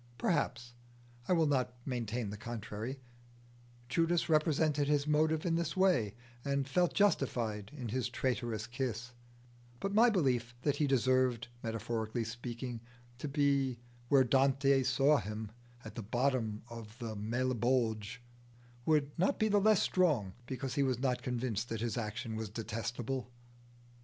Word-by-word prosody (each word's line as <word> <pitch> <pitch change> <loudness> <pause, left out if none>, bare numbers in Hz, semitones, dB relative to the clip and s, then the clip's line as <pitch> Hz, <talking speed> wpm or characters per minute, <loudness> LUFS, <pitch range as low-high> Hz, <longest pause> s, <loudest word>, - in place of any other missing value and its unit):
Perhaps 120 +1 -1 0.5
I - - +3
will 165 -2 +4
not 130 -4 +1
maintain 120 -4 -2
the - - -5
contrary 115 +3 -5 0.9
Judas 165 +4 +1
represented 155 -2 +2
his 145 -1 +2
motive 155 +2 +2
in 170 - +1
this 165 0 -1
way, 175 - +3 0.3
and 140 -1 0
felt 175 +6 +2
justified 115 - +1
in 125 -4 -4
his 125 +2 -1
traitorous 120 -4 -1
kiss; 125 -1 -3 0.7
but 195 +7 -2
my 230 +4 +6
belief 125 - +1
that 145 - +1
he 150 - +2
deserved, 130 -3 +2
metaphorically 115 0 -2
speaking, 120 +1 -5 0.4
to 150 - -3
be 140 -3 +1 0.3
where 135 -2 +6
Dante 135 +1 +3
saw 140 +3 +4
him, 105 -1 -5 0.3
at 110 - -7
the 115 - -5
bottom 120 -1 0
of 115 -1 -10
the 115 -3 -5
Malebolge, 120 0 0 0.6
would 150 -2 +3
not 185 - +2
be 220 - +2
the 205 -1 +4
less 215 -1 +5
strong 145 - +2
because 130 0 -3
he 140 - +1
was 130 -3 +2
not 125 -1 0
convinced 120 -2 -2
that 115 -1 -3
his 115 -2 -1
action 110 0 -3
was 110 -1 -4
detestable. 115 +3 -4
125 Hz, 140 wpm, -33 LUFS, 115-145 Hz, 0.9 s, my